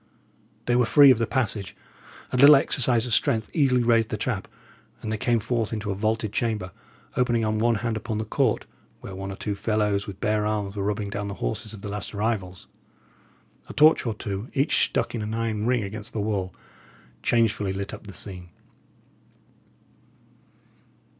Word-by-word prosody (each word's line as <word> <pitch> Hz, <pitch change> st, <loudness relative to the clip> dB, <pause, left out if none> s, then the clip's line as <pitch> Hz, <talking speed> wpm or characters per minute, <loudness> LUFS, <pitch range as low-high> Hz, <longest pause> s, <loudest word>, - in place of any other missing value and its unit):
They 120 Hz, -, +2 dB
were 125 Hz, -2 st, +3 dB
free 145 Hz, -2 st, +8 dB
of 125 Hz, -, +3 dB
the 115 Hz, -, 0 dB
passage. 110 Hz, -7 st, -2 dB, 0.6 s
A -, -, -2 dB
little 140 Hz, +4 st, +9 dB
exercise 125 Hz, -4 st, +2 dB
of 120 Hz, -, -2 dB
strength 110 Hz, +1 st, +1 dB
easily 130 Hz, -6 st, +3 dB
raised 115 Hz, -2 st, +3 dB
the -, -, -2 dB
trap; -, -, -2 dB, 0.5 s
and 110 Hz, -, -5 dB
they 110 Hz, -, -1 dB
came 120 Hz, 0 st, +2 dB
forth 115 Hz, 0 st, -1 dB
into 105 Hz, -2 st, -3 dB
a -, -, 0 dB
vaulted 110 Hz, +1 st, -1 dB
chamber, 110 Hz, -6 st, -1 dB, 0.4 s
opening 120 Hz, -2 st, +1 dB
on 110 Hz, 0 st, 0 dB
one 115 Hz, +1 st, +3 dB
hand 115 Hz, -1 st, 0 dB
upon 110 Hz, 0 st, -3 dB
the 110 Hz, -, -2 dB
court, -, -, 0 dB, 0.4 s
where 95 Hz, -, -8 dB
one 95 Hz, +1 st, -5 dB
or -, -, -6 dB
two 105 Hz, -, -3 dB
fellows, 105 Hz, -1 st, 0 dB
with 95 Hz, -1 st, -8 dB
bare 105 Hz, 0 st, +1 dB
arms, 105 Hz, -1 st, -2 dB
were 100 Hz, -, -3 dB
rubbing 100 Hz, 0 st, -2 dB
down 105 Hz, 0 st, -3 dB
the 100 Hz, -, -5 dB
horses 100 Hz, -, -3 dB
of 100 Hz, -, -12 dB
the -, -, -4 dB
last 100 Hz, +1 st, -5 dB
arrivals. 100 Hz, -4 st, -2 dB, 1.0 s
A -, -, -7 dB
torch 155 Hz, -4 st, +5 dB
or 110 Hz, -, -1 dB
two, 100 Hz, +1 st, -5 dB
each 140 Hz, +3 st, +3 dB
stuck -, -, -2 dB
in 115 Hz, -, -3 dB
an 110 Hz, +1 st, -3 dB
iron 115 Hz, -1 st, -1 dB
ring 125 Hz, -3 st, +2 dB
against 105 Hz, +3 st, -6 dB
the 110 Hz, -, -2 dB
wall, 100 Hz, -3 st, -1 dB, 0.7 s
changefully 110 Hz, -4 st, +1 dB
lit 100 Hz, +1 st, -4 dB
up -, -, -9 dB
the 100 Hz, -, -9 dB
scene. 90 Hz, -3 st, -9 dB
110 Hz, 185 wpm, -25 LUFS, 100-115 Hz, 1.0 s, little